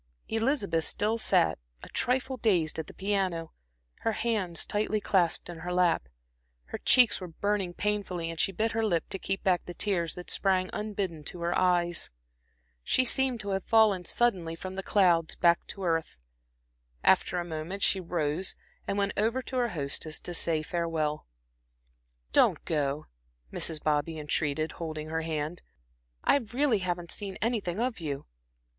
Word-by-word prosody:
Elizabeth 225 - +1
still 215 +3 0
sat, - - +3 0.2
a - - -9
trifle 260 +1 0
dazed, 180 -10 +1
at 160 - -4
the - - -11
piano, 190 -5 -1 0.5
her 225 - 0
hands 205 -8 0
tightly 215 +1 0
clasped 180 -5 +1
in 175 -2 -8
her 175 +2 -4
lap. 175 - +2 0.6
Her - - -6
cheeks 240 -6 +5
were 180 - -5
burning 190 +1 -1
painfully 190 -5 -1
and 165 - -8
she - - +3
bit 220 +4 0
her 225 +1 0
lip 175 -7 +1
to 195 - -4
keep 195 +1 -3
back 180 -2 +2
the 175 - -8
tears 175 -5 0
that 180 - -5
sprang 185 -2 +1
unbidden 200 -7 -3
to 175 - -6
her 170 +1 0
eyes. 175 -2 +2 0.7
She 255 - +3
seemed 255 -2 +2
to 205 - -5
have 195 -1 -1
fallen 215 -5 +4
suddenly 180 -7 +1
from 185 +3 -7
the 195 - -3
clouds 175 -5 +3
back 170 0 +3
to 195 - -6
earth. 165 - 0 0.9
After - - +4
a 175 - -1
moment 170 +4 -4
she 195 - +4
rose 170 0 -1 0.3
and 200 - -1
went 200 0 +1
over 230 +5 +1
to 260 - -4
her 240 -1 +2
hostess 155 -1 -3
to 175 - -5
say 165 -2 +1
farewell. 160 - -2 1.1
"Don't - - +4
go," 145 -1 -1 0.5
Mrs. 160 -2 0
Bobby 155 +1 0
entreated, 150 +1 -1
holding 155 -2 -5
her 160 0 -1
hand, 160 +1 -3 0.6
"I - - +5
really 250 -1 +1
haven't 175 -2 -3
seen 200 -2 -4
anything 215 -5 -1
of 240 -2 -1
you." 145 -4 -4
180 Hz, 165 wpm, -29 LUFS, 165-210 Hz, 1.1 s, cheeks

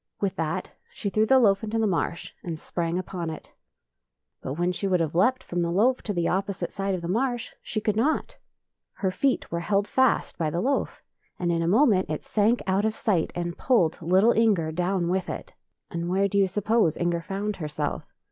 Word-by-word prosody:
With 200 -2 -1
that 160 -1 -2 0.2
she 200 - -4
threw 215 +2 +2
the 265 - +6
loaf 200 -4 +4
into 220 +1 -2
the 225 - +2
marsh 170 -3 -2
and 165 -3 -5
sprang 170 +1 -2
upon 180 -2 -4
it. 160 - -8 0.9
But 130 - -4
when 175 +2 +1
she 195 +2 -2
would 185 -2 +2
have 160 -2 -1
leaped 255 +10 +2
from 175 0 -2
the 170 - 0
loaf 225 +9 +2
to 210 - -4
the 175 -4 0
opposite 195 0 -2
side 195 -1 -1
of 175 - -6
the - - -3
marsh, 240 +4 -1
she 215 - -3
could 210 -1 0
not. 275 +9 0 0.6
Her 190 -2 -1
feet 265 +8 0
were 170 - -1
held 200 +3 0
fast 260 -4 +1
by 160 -2 +1
the 170 - -2
loaf, 270 +8 -1 0.3
and 175 -1 0
in 165 -1 +1
a 165 - 0
moment 205 - +4
it 155 - -3
sank 220 +3 +1
out 190 +2 +1
of 220 0 0
sight 185 -7 0
and 175 -1 -4
pulled 180 -13 +2
little 190 +7 +4
Inger 205 -9 +2
down 180 +1 0
with 185 0 -1
it. - - -6 0.4
And 170 0 -3
where 195 +2 +2
do 200 +1 +1
you 195 - +4
suppose 210 -2 +1
Inger 170 -1 0
found 200 +4 -3
herself? 150 -3 -4
190 Hz, 210 wpm, -26 LUFS, 170-215 Hz, 0.9 s, the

